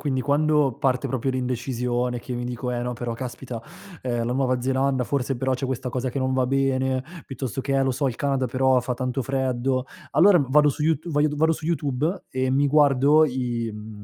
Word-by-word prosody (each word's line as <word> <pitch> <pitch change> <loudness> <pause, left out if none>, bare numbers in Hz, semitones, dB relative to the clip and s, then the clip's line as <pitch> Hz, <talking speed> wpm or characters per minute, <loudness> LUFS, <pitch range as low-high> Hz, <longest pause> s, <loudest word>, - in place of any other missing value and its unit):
quindi 135 -3 -1
quando 145 -1 +2
parte 130 -3 0
proprio 130 0 -1
l'indecisione 125 -1 -2
che 125 - -7
io 120 - -3
mi 120 - -3
dico: 125 +1 -4
"Eh 120 - -2
no, 125 0 -2
però 120 0 -4
caspita, 125 -1 -6 0.4
ehm, 120 -2 -1
la 120 - -1
nuova 130 -1 +1
Zelanda, 130 +1 +1
forse 135 +1 -1
però 130 +2 0
c'è 130 +1 -3
questa 130 0 -3
cosa 125 +1 -2
che 130 - -3
non 130 0 0
va 130 -1 +1
bene", 130 -1 +1 0.2
piuttosto 135 -2 -4
che 135 +1 -2
"Eh 135 - +3
lo 135 - +1
so, 135 +3 -1
il 130 - -1
Canada, 135 -2 0
però 130 +1 +2
fa 125 0 -3
tanto 130 +1 -2
freddo". 130 0 -1 0.3
Allora 185 +3 +6
vado 150 +3 +4
su 145 +2 -2
YouTu 160 +1 0
voglio 150 0 +2
d 150 - -4
vado 160 +2 +3
su 160 - -6
YouTube 155 +2 -1
e 130 0 -1
mi 140 +2 +2
guardo 145 +1 +5
i, 120 -4 -2
mhmm, 105 0 -9
130 Hz, 220 wpm, -24 LUFS, 125-140 Hz, 0.4 s, Allora